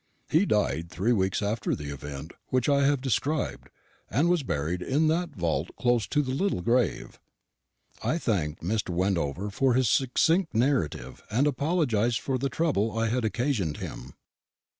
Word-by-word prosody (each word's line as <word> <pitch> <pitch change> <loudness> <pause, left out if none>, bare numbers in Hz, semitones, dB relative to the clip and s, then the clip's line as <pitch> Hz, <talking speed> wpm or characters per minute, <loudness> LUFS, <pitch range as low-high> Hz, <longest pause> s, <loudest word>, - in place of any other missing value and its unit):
He 170 +6 +4
died 85 -6 0
three 100 +7 +1
weeks 95 -1 0
after 105 +3 -1
the 75 -1 -6
event 70 +2 -7 0.2
which 130 -2 +1
I 140 -1 +4
have 140 -2 +2
described, 140 +3 -1 0.4
and 150 +8 +2
was 175 -2 +3
buried 85 - -2
in 150 - +2
that 175 +2 0
vault 85 -3 -1
close 120 -4 +1
to 150 +5 +1
the 130 - -3
little 145 - 0
grave." 120 -2 0 0.8
I 165 - 0
thanked 85 - -1
Mr. 105 +3 -1
Wendover 90 +1 -1
for 130 +4 +2
his 130 -4 +3
succinct 160 - +2
narrative, 110 - 0
and 125 +7 +2
apologised 130 - +1
for 130 -2 -2
the 135 +2 -1
trouble 115 -10 0
I 115 0 +1
had 125 +1 0
occasioned 110 - -1
him. 65 +3 -8
115 Hz, 160 wpm, -27 LUFS, 90-140 Hz, 0.8 s, He